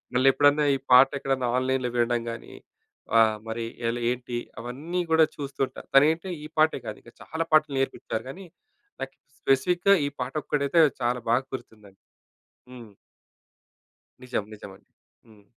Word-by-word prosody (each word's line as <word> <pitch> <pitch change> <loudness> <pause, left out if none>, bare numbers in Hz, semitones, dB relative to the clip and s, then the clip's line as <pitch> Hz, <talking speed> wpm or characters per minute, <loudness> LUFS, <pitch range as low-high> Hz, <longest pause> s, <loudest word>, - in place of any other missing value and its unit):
మళ్ళెప్పుడన్నా 145 +3 +4
ఈ - - -1
పాటెక్కడన్నా 135 -1 +4
ఆన్లైన్‌లో 130 -1 0
వినడం 120 0 +1
గానీ, 115 - -9 0.6
ఆహ్, 110 -1 +4
మరి 115 +1 -3 0.2
ఎలా, 120 +1 -2
ఏంటి, 125 -1 -4 0.2
అవన్నీ 150 +9 -4
గూడా 160 0 +6
చూస్తుంటా. 135 -2 -4
తనైతే 160 +6 +4 0.2
ఈ - - -6
పాటే 155 -3 +3
కాదు, 105 - -5
ఇంకా 120 - -16
చాలా 160 +1 -3
పాటలు 155 -3 +3
నేర్పిచ్చారు. 135 -4 -3
గానీ, 190 +6 -9 0.6
నాకి 135 0 -6 0.2
స్పెసిఫిక్‌గా 180 +8 +3
ఈ - - -2
పాటొక్కటైతే, 145 +4 +1 0.2
చాలా 120 0 0
బాగ 125 +3 +3
గుర్తుందండి. 105 -5 -13 0.7
హ్మ్. 120 -4 -12 1.3
నిజం. 125 -4 -2
నిజమండి. 100 -2 -12 0.4
హ్మ్. 105 -2 -20
130 Hz, 125 wpm, -26 LUFS, 120-145 Hz, 1.3 s, గూడా